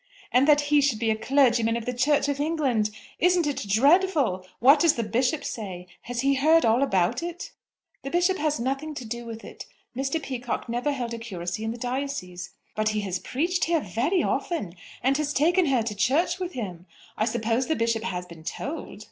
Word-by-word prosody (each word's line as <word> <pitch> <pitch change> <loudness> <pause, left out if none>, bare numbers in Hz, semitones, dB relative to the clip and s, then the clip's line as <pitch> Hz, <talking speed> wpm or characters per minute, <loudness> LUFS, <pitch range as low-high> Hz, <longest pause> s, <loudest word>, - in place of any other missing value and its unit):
"And 255 +3 +4
that 295 -1 +6
he 295 - +6
should 275 -5 +2
be 225 0 +1
a - - +1
clergyman 235 -2 +2
of 230 - -6
the 250 - -2
Church 280 +3 +2
of 285 -1 -1
England! 285 -9 +1 0.3
Isn't 355 -1 +3
it 285 -8 -2
dreadful? 275 - +3
What 275 +5 +6
does 330 0 +4
the 235 - -1
Bishop 255 +7 0
say? 185 -5 -5 0.2
Has 240 -1 -1
he 275 +1 +3
heard 315 +5 +4
all 230 +3 +3
about 190 - +1
it?" 345 0 -6 0.5
"The 275 - -5
Bishop 355 +4 +2
has 300 -2 0
nothing 275 +5 -2
to 255 - -6
do 235 +2 -5
with 225 0 -8
it. - - -10 0.3
Mr. 270 +5 -1
Peacocke 250 -5 -4
never 240 +5 -1
held 245 -4 -3
a 230 - -5
curacy 185 -3 -5
in 220 - -2
the 230 - -4
diocese." 245 -9 -4 0.3
"But 215 0 +1
he 215 -1 -1
has 190 -2 -3
preached 335 - -1
here 335 -1 +2
very 260 - 0
often, 305 - -2 0.3
and 265 +2 +3
has 300 -1 -1
taken 345 +4 +3
her 260 -4 +2
to 220 -1 -3
church 305 - +1
with 365 -1 -4
him! 185 -7 -6 0.3
I 215 - +1
suppose 235 +2 0
the 315 - +1
Bishop 230 -2 0
has 180 -5 -3
been 170 -2 -13
told?" 280 - -5
255 Hz, 205 wpm, -26 LUFS, 220-295 Hz, 0.5 s, that